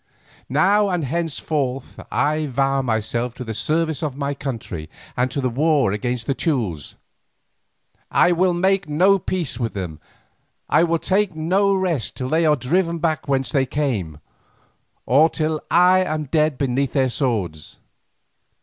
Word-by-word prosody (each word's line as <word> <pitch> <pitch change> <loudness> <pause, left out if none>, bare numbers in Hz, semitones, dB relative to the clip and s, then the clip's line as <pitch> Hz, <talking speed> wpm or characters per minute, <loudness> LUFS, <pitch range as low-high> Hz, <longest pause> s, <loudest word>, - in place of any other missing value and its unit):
Now 200 +9 +3
and 175 -5 -1
henceforth 140 -3 -3
I 155 +2 +1
vow 135 +1 +1
myself 115 0 -2
to 130 - -6
the 115 -2 -5
service 160 +8 -1
of 145 -4 -3
my 140 0 -2
country 115 - -6 0.3
and 125 +1 +1
to 130 0 -1
war 140 -1 +2
against 120 +2 -2
the 140 - 0
Teules. 115 - -2 1.1
I 180 - +4
will 180 +1 +2
make 190 0 +1
no 185 +6 +4
peace 165 -9 -3
with 115 -3 -3
them, 85 -6 -5 0.7
I - - +4
will 165 0 +2
take 190 +1 0
no 190 +5 +2
rest 175 - -1
till 130 0 -3
they 160 +2 +2
are 150 - +5
driven 170 +6 0
back 160 -2 -1
whence 135 -2 0
they 135 -3 +1
came, 110 - -2 0.9
or 145 +7 +5
till 155 -1 -2
I 180 +2 +5
am 155 -3 -2
dead 150 0 +1
beneath 135 0 -1
their 130 -3 +2
swords. 100 - -2
145 Hz, 150 wpm, -21 LUFS, 125-165 Hz, 1.1 s, are